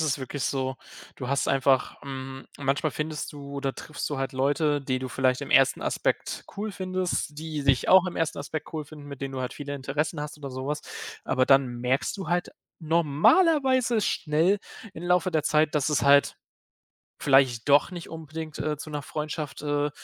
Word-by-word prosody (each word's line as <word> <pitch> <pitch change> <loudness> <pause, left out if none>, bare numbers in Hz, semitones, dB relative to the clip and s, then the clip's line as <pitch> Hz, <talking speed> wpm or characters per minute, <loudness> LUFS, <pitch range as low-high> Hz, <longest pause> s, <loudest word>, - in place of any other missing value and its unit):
ist 140 -2 0
wirklich 130 0 -4
so. 130 -1 -1 0.4
Du 125 - -5
hast 140 +1 +1
einfach, 135 -1 +2
hm 135 -1 -7
manchmal 140 +3 0
findest 155 0 -4
du 140 -1 -9
oder 140 -1 -2
triffst 150 - -5
du 145 - -2
halt 135 +1 -2
Leute, 145 +2 +1
die 130 -1 -1
du 130 0 -5
vielleicht 130 +1 +1
im - - -6
1. 135 0 +5
Aspekt - - -1
cool 210 +2 -3
findest, 185 -5 -2
die 155 -2 -4
dich 135 -2 +3
auch 185 0 +7
im 180 - -5
1. 165 -2 0
Aspekt 150 +2 -5
cool 155 -1 -3
finden, 145 0 -12
mit 140 -1 -8
denen 135 0 -3
du 130 - -4
halt 125 - -4
viele 145 -1 -5
Interessen 145 +3 -2
hast 150 0 -5
oder 140 -2 -7
sowas. 135 +4 -3 0.4
Aber 130 -1 +2
dann 135 -1 +5
merkst 130 +3 0
du 190 -5 -5
halt 175 0 0 0.3
normalerweise 230 - +3
schnell 165 +3 +2 0.3
im 165 - -9
Laufe 180 0 +2
der 155 -3 +1
Zeit, 155 0 +2
dass 150 -1 +2
es 150 - +1
halt 140 0 +5 0.8
vielleicht 135 -4 +3
doch 145 +5 +5
nicht 175 -2 -7
unbedingt, 160 -1 -7
äh, 150 0 -1
zu 150 +2 -8
'ner 150 -1 -3
Freundschaft, 150 +1 -5
äh, 145 0 0
145 Hz, 190 wpm, -27 LUFS, 135-160 Hz, 0.8 s, auch